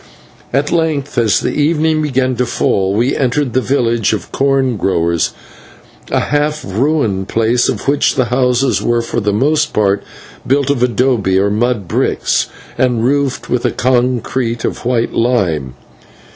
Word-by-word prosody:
At 140 +3 0
length, 155 -4 -1
as 110 -5 +2
the - - -1
evening 155 +1 +1
began 130 -3 0
to 125 - 0
fall, 95 -4 0
we 120 +5 +1
entered 130 -1 0
the 130 - +2
village 120 -5 +1
of 110 - -5
corn 135 -2 +1
growers, 85 -4 0 0.8
a - - +1
half 150 +1 -1
ruined 110 -3 0
place 115 +2 +1
of - - -3
which 140 +1 +2
the 130 - +2
houses 125 0 +1
were 120 0 +1
for - - -2
the 105 -2 0
most 150 +8 +1
part 100 -1 +1 0.5
built 140 +1 +2
of 140 - -1
/adobe/ 120 -5 +1
or 100 +1 +2
mud 110 -2 0
bricks, - - 0 0.3
and 125 -3 +1
roofed 140 0 0
with 125 -1 -1
a - - +2
concrete 125 -1 0
of - - -4
white 120 -1 0
lime. 90 - 0
125 Hz, 155 wpm, -15 LUFS, 110-140 Hz, 0.8 s, as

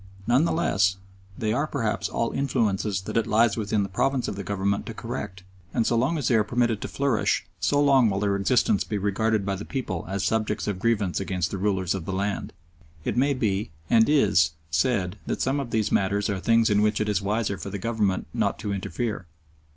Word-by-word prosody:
None 125 +6 +3
the - - +1
less, 100 - +2 0.4
they 110 -1 0
are 145 +5 0
perhaps 115 -8 -2
all 115 - -1
influences 110 -7 0
that 95 - -4
it 115 - +1
lies 110 0 +3
within 105 -2 0
the - - -2
province 130 +7 0
of - - -3
the 100 - -5
Government 100 0 -1
to 115 - -6
correct, 105 -5 -6 0.3
and 115 - +2
so 120 - +2
long 130 +8 +1
as 145 - -1
they - - +2
are 110 -2 +4
permitted 120 -1 0
to - - -3
flourish 135 -6 0
so 145 - +2
long 135 -5 +5
will 95 -1 -1
their 100 -1 +1
existence 100 0 +2
be 105 - -3
regarded 105 +1 0
by 100 - 0
the 100 - -6
people 115 -12 -4
as 100 0 -2
subjects 110 -1 0
of 100 -3 -2
grievance 100 -4 +1
against 90 -3 -2
the 100 - -3
rulers 95 -3 0
of 95 -4 -5
the 95 - -3
land. 100 +2 -2 0.5
It - - -1
may 140 +3 +2
be, 105 -5 -1 0.2
and 115 +2 +5
is, 100 - +4 0.2
said 95 +3 0
that - - -1
some 135 +2 +1
of 135 -4 -4
these 110 -2 0
matters 100 +1 +1
are 95 - -2
things 115 +4 +3
in 105 0 +3
which 105 0 +2
it 105 - 0
is 105 -2 +1
wiser 100 0 -1
for - - -5
the 100 - -4
Government 105 -2 0
not - - 0
to 105 - -3
interfere. 105 0 -3
105 Hz, 220 wpm, -25 LUFS, 100-115 Hz, 0.5 s, long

